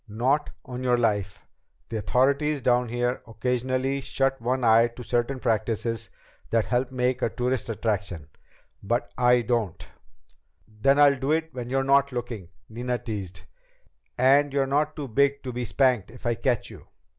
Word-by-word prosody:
"Not 130 +8 0 0.2
on 125 -1 -6
your 125 -1 +3
life! 105 -4 -1 0.4
The 115 - -3
authorities 140 +6 +1
down 125 -1 +2
here 120 +1 -1
occasionally 130 +4 -1
shut 135 0 -1
one 125 +2 -1
eye 115 0 +6
to 120 +1 -10
certain 120 +3 -1
practices 115 -1 -1 0.4
that 115 -1 +2
help 125 +1 0
make 125 0 0
a - - +1
tourist 125 +1 -2
attraction. 100 -7 -2 0.6
But 120 +5 -2
I 125 0 +4
don't!" 115 -6 -2 0.8
"Then 110 +6 +2
I'll 140 -2 +6
do 135 +3 -1
it 160 -1 -1
when 125 -1 -6
you're 135 +1 +1
not 140 +1 +3
looking," 120 -7 -5 0.2
Nina 120 +2 -3
teased. 95 -6 -6 0.7
"And 140 +3 +4
you're 135 0 +1
not 150 +3 0
too 145 -3 -5
big 140 +4 +1
to 130 -2 -5
be 120 0 -3
spanked 125 -4 +2
if 120 +2 -14
I 120 - +2
catch 120 -1 -1
you." - - -13
125 Hz, 160 wpm, -26 LUFS, 115-135 Hz, 0.8 s, eye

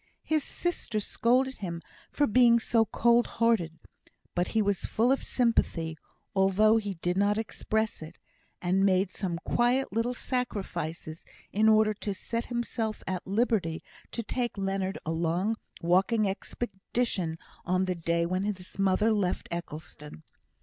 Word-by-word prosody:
His 310 -2 +1
sister 310 -12 -2
scolded 255 +5 +1
him 170 -4 -5 0.3
for 290 - +2
being 235 +1 +5
so 230 -1 +2
cold 235 +2 +3
hearted; 220 -9 +2 0.6
but 175 0 0
he 220 - +1
was 200 -2 0
full 235 +4 +2
of 270 - +2
sympathy, 170 -9 +1 0.4
although 195 +3 +4
he 205 -3 -2
did 175 +1 -1
not 205 +1 +3
express 220 -1 -2
it, 160 +2 -9 0.5
and 185 +2 +2
made 190 -1 +3
some 180 -4 -3
quiet 245 0 +1
little 230 +3 0
sacrifices 175 - -3 0.3
in 220 +2 +4
order 215 0 +5
to 205 -1 -4
set 230 +4 -3
himself 235 -2 -3
at 185 -1 -4
liberty 195 -6 0 0.3
to 230 - -3
take 240 0 -2
Leonard 195 0 -1
a 160 - -1
long 170 +6 0 0.3
walking 195 +5 +3
expedition 195 -3 -2 0.3
on 185 +1 +1
the 185 - 0
day 170 0 0
when 185 +3 -1
his 190 -2 -5
mother 195 +3 +3
left 195 -4 -1
Eccleston. 155 -2 -7
200 Hz, 145 wpm, -29 LUFS, 180-230 Hz, 0.6 s, being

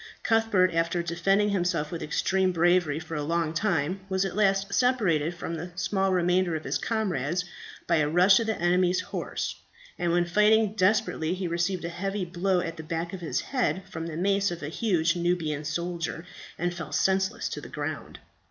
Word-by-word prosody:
Cuthbert, 225 -6 +3
after 170 +1 0
defending 195 +5 +1
himself 175 -6 0
with 170 - -5
extreme 190 +4 +1
bravery 175 -3 +2
for 165 0 -7
a 150 - -2
long 165 +1 -1
time, 175 -1 0
was 190 0 +1
at 190 - -4
last 200 -1 +2
separated 185 - +2
from 170 -1 -5
the 170 +2 -6
small 195 +1 0
remainder 180 -1 +2
of 155 - -4
his - - -1
comrades 180 - -1 0.4
by 170 - +2
a 150 -1 +2
rush 180 +4 +5
of 230 - -2
the 220 - -1
enemy's 180 +1 +2
horse, 180 - -4 0.4
and 175 -1 +1
when 175 0 +2
fighting 210 +3 +3
desperately 185 -4 +1
he 185 -1 -3
received 170 +1 -1
a - - -2
heavy 195 +3 -3
blow 180 +1 0
at 165 0 -5
the 160 - -7
back 165 +2 -4
of 190 - -5
the 170 - -2
head 250 -7 0
from 165 0 -5
the 160 -1 -5
mace 195 +2 +2
of 175 -2 -6
a 145 - -3
huge 170 -3 +1
Nubian 170 -4 -1
soldier, 170 +2 -3 0.3
and 175 +1 -1
fell 170 -2 -7
senseless 190 +4 +1
to - - -5
the - - -10
ground. - - -5
175 Hz, 190 wpm, -27 LUFS, 165-195 Hz, 0.4 s, rush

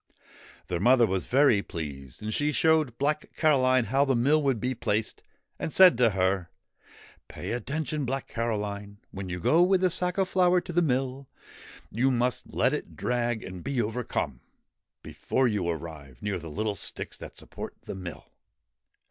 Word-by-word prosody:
Their 90 - -2
mother 120 +4 +5
was 95 -3 -2
very 130 -6 +4
pleased, 70 -5 -7
and 110 0 -3
she 145 +5 +1
showed 155 -5 +2
Black 150 +2 -1
Caroline 130 -5 +3
how 135 +3 +2
the 135 -2 +1
mill 140 +6 +3
would 135 -5 +1
be 125 +4 -1
placed, 110 -2 -2 0.4
and - - -3
said 185 +1 +7
to 120 -2 +5
her: 95 -2 0 0.4
' - - -23
Pay - - -6
attention, 145 +5 -2
Black 135 +1 -3
Caroline: 105 -3 -3
when 95 -1 -6
you 90 0 -4
go 160 - +4
with 185 +1 +4
the 185 -1 +3
sack 180 +1 -1
of 190 -1 +2
flour 180 -1 +3
to 175 0 -8
the 175 - +3
mill, 135 -2 -1 0.6
you 125 +5 +2
must 125 0 0
let - - +2
it - - -5
drag 120 -2 -1
and 90 -1 -8
be 135 -1 -2
overcome, 110 - -2 0.6
before 130 -1 0
you 100 -6 -1
arrive 75 -6 -7
near 100 -3 -1
the 80 -1 -8
little 105 +6 -2
sticks 100 - -4
that - - -10
support - - -8
the - - -6
mill. 90 -3 -8
120 Hz, 175 wpm, -27 LUFS, 100-140 Hz, 0.6 s, said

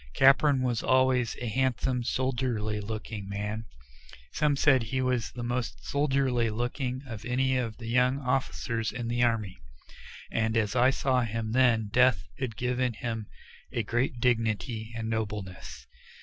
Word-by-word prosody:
Capron 135 0 +5
was 120 -3 0
always 130 -2 +2
a 125 - -4
handsome, 125 +1 0
soldierly 120 -4 -1
looking 110 -1 -6
man 105 +2 -3 0.7
some 150 -2 +2
said 135 -2 +4
that 115 - -5
he 130 +3 -1
was 125 -3 0
the 120 - -6
most 120 0 -3
soldierly 135 -5 +1
looking 125 +3 -3
of 115 -4 -7
any 130 +2 +1
of 115 -4 -2
the 115 - -9
young 125 +3 +2
officers 125 -4 -1
in 120 -1 -4
the 120 +1 0
army 110 - 0 0.7
and 110 0 +1
as 110 +1 0
I 125 +1 +5
saw 130 -1 +1
him 115 -1 -3
then 120 -4 +3
death 125 -3 +4 0.2
had 120 -6 -3
given 125 0 0
him 115 -2 -4 0.4
a 120 -3 -1
great 120 +3 -1
dignity 115 -2 0
and 110 -1 -3
nobleness. 105 -4 -4
120 Hz, 150 wpm, -28 LUFS, 110-130 Hz, 0.7 s, Capron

